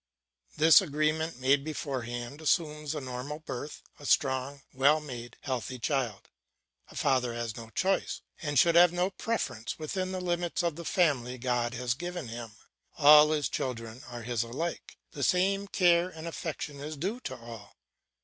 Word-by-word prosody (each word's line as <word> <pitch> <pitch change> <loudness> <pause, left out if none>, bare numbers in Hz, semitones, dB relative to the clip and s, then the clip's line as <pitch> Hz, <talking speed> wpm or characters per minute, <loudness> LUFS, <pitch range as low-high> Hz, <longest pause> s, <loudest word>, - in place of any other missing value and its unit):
This 160 +4 +8
agreement 155 -1 0
made 135 +2 +3
beforehand 130 -3 -4
assumes 150 -1 0
a 150 - -3
normal 130 +3 -5
birth, 145 -1 -7 0.2
a 145 - -7
strong, 135 0 +1
well 140 +4 +4
made, 125 -5 -8
healthy 130 -1 -3
child. 125 -4 -2 0.6
A - - -14
father 125 -4 +1
has 115 -2 -3
no 115 -1 -9
choice, 190 +10 0 0.2
and 145 -4 -1
should 170 +4 +6
have 175 0 +7
no 180 +2 0
preference 185 - -3
within 185 +4 -3
the 185 - -3
limits 175 -1 -1
of 170 -3 0
the 170 +1 -8
family 130 -10 +1
God 120 -1 -1
has 125 0 0
given 175 -1 -5
him; 115 -1 -7 0.4
all 150 +1 +8
his 150 -2 +1
children 115 -1 -4
are 120 -2 -7
his 120 -1 -1
alike, 135 +9 -4
the 145 - -7
same 195 +5 +2
care 175 -2 +3
and 160 -2 -8
affection 155 -3 -5
is 150 +2 -6
due 195 - -2
to 130 - -6
all. 115 -4 -11
145 Hz, 160 wpm, -29 LUFS, 125-165 Hz, 0.6 s, This